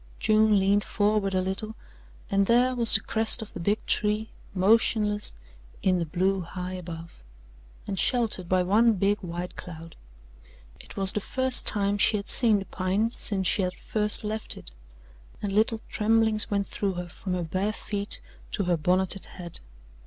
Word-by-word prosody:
June 215 -1 +3
leaned 200 +2 +2
forward 205 -2 0
a 185 - +2
little, 215 +4 0 0.6
and 195 0 +2
there 250 +2 +3
was 235 -2 +8
the - - +4
crest 220 0 +3
of 215 - -13
the - - -7
big 205 +5 -1
tree 210 +1 -1 0.2
motionless 210 +1 +2 0.5
in 185 -1 +2
the 170 - -3
blue 190 +4 0
high 180 +1 -6
above, 170 - -9 0.6
and 195 -2 -4
sheltered 225 -8 +1
by 185 -1 +2
one 220 +5 +3
big 205 +1 0
white 175 0 -6
cloud. 165 -1 -10 0.8
It - - -14
was 195 -1 +3
the - - -2
first 260 +4 0
time 205 0 +1
she 210 - +3
had 200 - -7
seen 225 -4 +3
the 195 - -5
pine 195 +5 -1
since 195 -5 -1
she 200 - +2
had 180 -1 -2
first 210 0 +2
left 215 +1 -3
it, - - -4 0.7
and 200 -2 -4
little 220 +2 +1
tremblings 220 0 +1
went 200 -1 0
through 195 -1 -3
her 180 0 -6
from 185 +1 -6
her 180 - -2
bare 185 +6 -2
feet 205 -1 -4 0.3
to 200 - 0
her 175 -2 +1
bonneted 185 +4 0
head. 175 -3 -8
200 Hz, 170 wpm, -26 LUFS, 185-215 Hz, 0.8 s, was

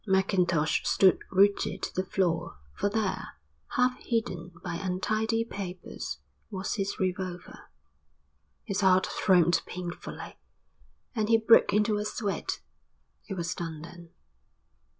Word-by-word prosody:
Mackintosh 180 -5 +2
stood 190 -2 +4
rooted 200 +1 +3
to - - -3
the 185 - 0
floor, 175 - -1 0.2
for 205 - 0
there, 205 - -2 0.4
half 250 0 +2
hidden 180 -7 -2
by 175 -2 -3
untidy 215 +5 0
papers, 185 -5 -6 0.3
was 195 -2 -3
his 200 -2 -2
revolver. 185 -1 -4 0.9
His 200 +1 -2
heart 185 -1 +5
throbbed 175 -3 +3
painfully, 175 -1 -7 0.7
and 215 -3 -1
he 225 - +6
broke 225 +1 +6
into 210 +1 +2
a 210 - -2
sweat. 210 -2 -2 0.7
It 195 - -4
was 170 -2 -1
done 160 -3 -5
then. 170 0 -11
190 Hz, 120 wpm, -29 LUFS, 175-210 Hz, 0.9 s, he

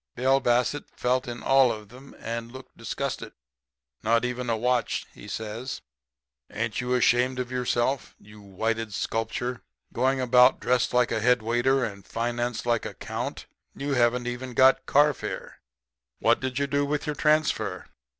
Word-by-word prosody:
"Bill 135 +2 +3
Bassett 125 +3 +1
felt 125 +1 0
in 120 0 -6
all 135 -2 +5
of 105 -2 -7
them, 130 +4 -14
and 115 +1 -5
looked 130 0 -12
disgusted. - - -4 0.7
"'Not 115 +2 +2
even 125 0 -3
a 115 - +1
watch,' 125 +1 0
he - - -12
says. 110 +4 -5 0.7
'Ain't 115 +1 -2
you 125 0 0
ashamed 125 +1 +3
of 125 -1 -3
yourself, 125 +1 -1
you 105 0 -15
whited 110 +2 -3
sculpture? 120 +3 -2 0.3
Going 130 +2 +1
about 125 0 +5
dressed 125 -1 +1
like 125 -1 +2
a 115 - 0
head 125 0 +3
waiter, 120 +3 +2
and 100 -3 -7
financed 120 +1 -2
like 120 -2 +1
a - - -9
Count! - - -5 0.3
You 140 +1 -2
haven't 120 -1 +2
even 120 0 -5
got 130 +1 +5
carfare. 145 -1 +1 0.6
What - - +3
did 130 -1 -3
you 140 - +1
do 140 +1 0
with 145 +1 -1
your 150 -1 -2
transfer?' 155 +1 +1
125 Hz, 160 wpm, -26 LUFS, 115-130 Hz, 0.7 s, all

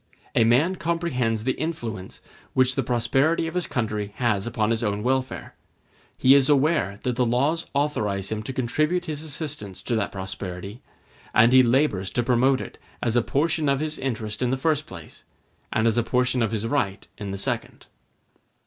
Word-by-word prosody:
A 115 - +4
man 145 +11 +3
comprehends 130 -10 -1
the 130 - +1
influence 120 - -5 0.3
which 130 0 +4
the 135 - 0
prosperity 135 +7 +1
of 165 - -4
his 180 -1 -1
country 105 -4 -2
has 110 -4 0
upon 110 -2 0
his 115 0 0
own 105 -1 -1
welfare; 130 +1 -1 0.6
he 130 - +6
is 140 -1 +5
aware 140 - +2
that 125 -1 0
the 125 - +3
laws 140 +8 +1
authorize 105 -10 0
him 110 -1 -3
to 110 - -5
contribute 155 +8 0
his 155 -2 -4
assistance 145 - -5
to 120 - -1
that 110 -2 -1
prosperity, 95 +2 -6 0.5
and 115 +3 +6
he 130 - +9
labors 120 -6 +2
to 120 - +1
promote 130 +2 +3
it - - -9 0.2
as 115 -1 +1
a 120 - +5
portion 150 +4 0
of 140 -1 +2
his 155 0 -3
interest 110 -4 -3
in 125 - +1
the 130 - 0
first 155 +2 0
place, 85 -4 -11 0.5
and 110 - +1
as 115 +1 +3
a - - +1
portion 125 +1 +1
of 110 - +2
his 110 0 -2
right 115 -7 -1
in 100 -2 -5
the 100 - -4
second. - - -4
125 Hz, 185 wpm, -24 LUFS, 110-145 Hz, 0.6 s, he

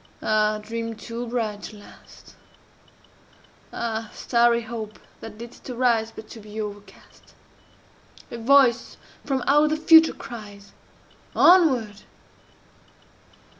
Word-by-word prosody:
Ah, 215 0 +1
dream 230 +1 -5
too 235 +2 -7
bright 220 -4 -3
to 215 - -9
last! 205 - -17 1.4
Ah, 225 -1 -4
starry 235 -1 +2
Hope, 220 -2 -7 0.2
that 225 -1 -10
didst 235 +3 -11
arise 235 -3 +1
But 220 - -11
to 230 - -10
be 210 0 -9
overcast! 205 -1 -10 1.0
A 235 - -6
voice 245 -1 +3 0.3
from 265 -3 -2
out 295 +2 +4
the 310 - 0
Future 320 +1 +6
cries, 205 -4 -11 0.6
"Onward!" 255 - +4
230 Hz, 105 wpm, -24 LUFS, 215-245 Hz, 1.4 s, Future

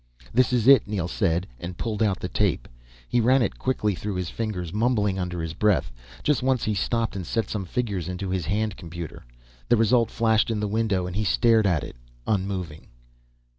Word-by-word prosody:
"This 130 +2 +3
is 125 -2 +1
it," 135 -5 +7
Neel 100 -5 -2
said, 85 0 0
and 85 +3 -6
pulled 110 -2 -3
out 100 -4 +2
the - - -3
tape. - - 0 0.4
He 120 - +2
ran 130 +3 +4
it - - -3
quickly 105 -5 0
through 100 +2 -4
his 90 -2 -3
fingers, 95 -7 -4
mumbling 105 -4 +1
under 90 -2 -3
his 80 -1 -4
breath. 100 -4 +1 0.3
Just 150 -5 +2
once 130 -1 +1
he 110 - 0
stopped 115 +3 -1
and 95 - -3
set 115 +5 -2
some 100 -3 -3
figures 100 -4 -2
into 90 +1 -4
his 95 -3 -2
hand 105 0 -1
computer. 85 -2 -8 0.5
The 120 - +5
result 115 +1 +3
flashed 110 -1 +2
in 110 -2 -1
the 105 - -1
window 105 -3 0
and 90 0 -5
he 105 - 0
stared 110 0 +3
at 80 -6 +1
it, - - -8 0.3
unmoving. 95 -6 -2
105 Hz, 200 wpm, -25 LUFS, 90-115 Hz, 0.5 s, it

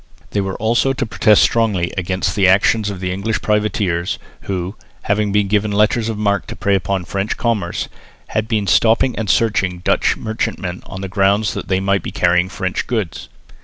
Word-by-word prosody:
They 100 - 0
were 95 -1 -3
also 120 +5 +2
to 130 -1 -2
protest 110 -1 +4
strongly 105 -7 +1
against 95 0 -1
the 100 -3 +4
action 100 +4 +4
of 95 -1 -7
English 100 +4 -1
privateers, 105 -4 0 0.3
who, 95 +1 -3 0.3
having 105 0 0
been 105 0 +2
given 105 +1 +1
letters 105 +2 +2
of 110 - -3
marque 100 -1 0
to - - -6
prey 100 - 0
upon 95 -1 0
French 100 +5 -2
commerce, 105 -8 -1 0.4
had 110 0 -1
been 110 -3 0
stopping 115 +5 +3
and 110 -3 -3
searching 95 -5 +1
Dutch - - +2
merchantmen 95 -5 -3
on 95 - -7
the 95 - -4
ground 100 +2 +2
that - - -5
they 95 -2 +1
might 100 -1 +1
be - - -5
carrying 90 +1 +2
French 95 -1 -3
goods. 110 -8 -3
100 Hz, 180 wpm, -18 LUFS, 95-110 Hz, 0.4 s, protest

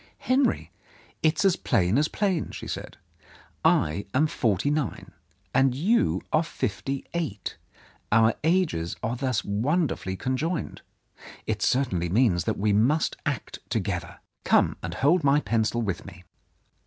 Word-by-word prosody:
"Henry, 260 +1 +1 0.5
it 155 0 +2
is - - +1
as 190 - +5
plain 95 -4 +1
as 150 - +2
plain," 190 -4 -1
she - - -8
said. - - -6 0.7
"I 80 +7 +2
am 145 +4 +4
forty 115 - 0
nine; 125 -10 -2 0.4
you 135 - +2
are 155 - +5
fifty 135 -3 -3
eight. 150 - -3 0.6
Our 110 +1 +5
ages 160 - +1
are 115 +2 -1
thus 125 -2 -1
wonderfully 120 - 0
conjoined. 135 - -2 0.6
It - - -2
certainly 95 -10 +1
means 95 -4 +2
that - - -1
we 105 0 +1
must 130 +10 +2
act - - -3
together. - - -2 0.3
Come - - +3
and 85 +1 -5
hold 160 - +3
my 140 +1 +4
pencil 115 -1 0
with 100 -5 -3
me. 90 -2 -12
130 Hz, 135 wpm, -26 LUFS, 100-155 Hz, 0.7 s, as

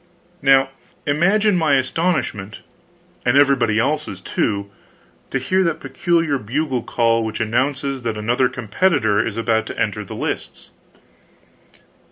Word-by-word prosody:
Now 135 -1 +4 0.4
imagine 195 +8 +3
my 160 -5 +3
astonishment 130 - -1 0.6
and 125 +2 +3
everybody 135 -6 +3
else's, 135 -4 -1
too 100 +1 -2 0.6
to - - -1
hear 185 +9 +1
the 165 -3 +1
peculiar 165 -5 0
bugle 130 +3 -2
call 115 0 +1
which 110 0 -4
announces 135 +4 -1
that 115 -2 -3
another 120 +4 +1
competitor 110 - +1
is 110 -1 -4
about 115 -1 0
to - - -7
enter - - -1
the - - -9
lists! - - -5
130 Hz, 125 wpm, -20 LUFS, 110-150 Hz, 0.6 s, Now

